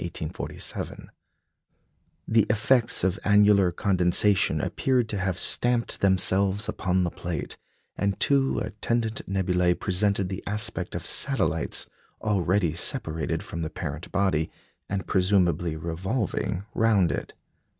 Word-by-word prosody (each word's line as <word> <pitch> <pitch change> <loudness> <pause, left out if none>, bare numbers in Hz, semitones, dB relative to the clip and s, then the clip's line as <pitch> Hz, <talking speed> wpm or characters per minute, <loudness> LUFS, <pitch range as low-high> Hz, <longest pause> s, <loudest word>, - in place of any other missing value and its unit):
The 80 -2 -5 1.4
effects 115 +1 +2
of 95 +3 +1
annular 105 -2 +5
condensation 95 +2 +2
appeared 125 -3 0
to 105 - -2
have 95 -2 -1
stamped 120 +3 0
themselves 95 +1 +3
upon 95 -1 0
the 85 - -1
plate, 85 -3 -4 0.4
and 100 -1 -1
two 135 -1 +2
attendant 110 +1 -1
nebulæ 90 -2 +1
presented 100 +1 0
the 95 0 -5
aspect 105 +1 -3
of - - -5
satellites 100 - +1 0.3
already 95 -4 +1
separated 80 - -1
from 85 - -6
the 80 - -3
parent 75 +3 -6
body, 95 -6 +1 0.4
and 100 -1 -2
presumably 90 -4 +1
revolving 90 +4 -2
round 105 -6 +3
it. - - -5
95 Hz, 110 wpm, -26 LUFS, 90-105 Hz, 1.4 s, annular